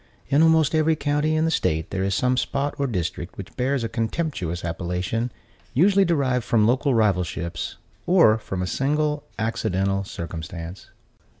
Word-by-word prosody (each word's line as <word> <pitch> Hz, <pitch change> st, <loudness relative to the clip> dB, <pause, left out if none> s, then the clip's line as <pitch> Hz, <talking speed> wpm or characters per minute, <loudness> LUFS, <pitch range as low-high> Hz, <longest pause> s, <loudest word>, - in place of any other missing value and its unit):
In 140 Hz, +3 st, +4 dB
almost 160 Hz, -2 st, +4 dB
every 160 Hz, 0 st, +3 dB
county 150 Hz, +1 st, 0 dB
in 155 Hz, +1 st, +2 dB
the 165 Hz, -, +1 dB
state 80 Hz, -, 0 dB
there 95 Hz, -, -1 dB
is 95 Hz, -1 st, 0 dB
some 125 Hz, 0 st, +2 dB
spot 140 Hz, +2 st, -1 dB
or 140 Hz, -, +1 dB
district 90 Hz, -4 st, -3 dB
which 95 Hz, -3 st, -9 dB
bears 130 Hz, 0 st, 0 dB
a -, -, 0 dB
contemptuous 115 Hz, -, -2 dB
appellation, 90 Hz, +8 st, -2 dB, 0.4 s
usually 195 Hz, +6 st, +5 dB
derived 135 Hz, -8 st, +1 dB
from 110 Hz, -2 st, +3 dB
local 130 Hz, +3 st, +2 dB
rivalships, 90 Hz, -6 st, -1 dB, 0.3 s
or 170 Hz, -12 st, +5 dB
from 95 Hz, -4 st, -4 dB
a -, -, -1 dB
single 150 Hz, +7 st, 0 dB
accidental 100 Hz, -4 st, 0 dB
circumstance. 85 Hz, 0 st, -7 dB
115 Hz, 155 wpm, -24 LUFS, 90-145 Hz, 0.4 s, usually